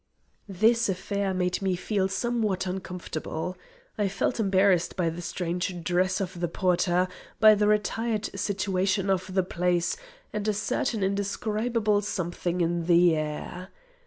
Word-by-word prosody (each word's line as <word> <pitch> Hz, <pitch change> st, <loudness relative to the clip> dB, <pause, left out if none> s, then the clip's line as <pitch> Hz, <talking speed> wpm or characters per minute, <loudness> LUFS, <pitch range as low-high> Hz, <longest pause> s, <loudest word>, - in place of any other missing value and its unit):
This 225 Hz, +4 st, +3 dB
affair 195 Hz, +1 st, -1 dB
made 180 Hz, 0 st, -1 dB
me 190 Hz, -2 st, +1 dB
feel 190 Hz, +1 st, 0 dB
somewhat 205 Hz, 0 st, -1 dB
uncomfortable. 180 Hz, -2 st, -4 dB, 0.4 s
I 205 Hz, -, +2 dB
felt 195 Hz, +5 st, -1 dB
embarrassed 190 Hz, -3 st, +3 dB
by 170 Hz, -3 st, 0 dB
the 170 Hz, +2 st, -6 dB
strange 175 Hz, +1 st, -3 dB
dress 185 Hz, +2 st, +1 dB
of 185 Hz, -3 st, -4 dB
the 175 Hz, -, 0 dB
porter, 180 Hz, +1 st, +1 dB, 0.3 s
by 215 Hz, -1 st, +8 dB
the 210 Hz, 0 st, +2 dB
retired 210 Hz, +1 st, 0 dB
situation 195 Hz, -1 st, 0 dB
of 185 Hz, 0 st, -1 dB
the 190 Hz, 0 st, +2 dB
place, 175 Hz, -1 st, 0 dB, 0.4 s
and 210 Hz, 0 st, -2 dB
a 215 Hz, -, +2 dB
certain 215 Hz, 0 st, -1 dB
indescribable 210 Hz, +2 st, 0 dB
something 175 Hz, -2 st, -2 dB
in 170 Hz, 0 st, 0 dB
the 175 Hz, -1 st, +5 dB
air. 155 Hz, +4 st, -4 dB
190 Hz, 135 wpm, -27 LUFS, 180-205 Hz, 0.4 s, by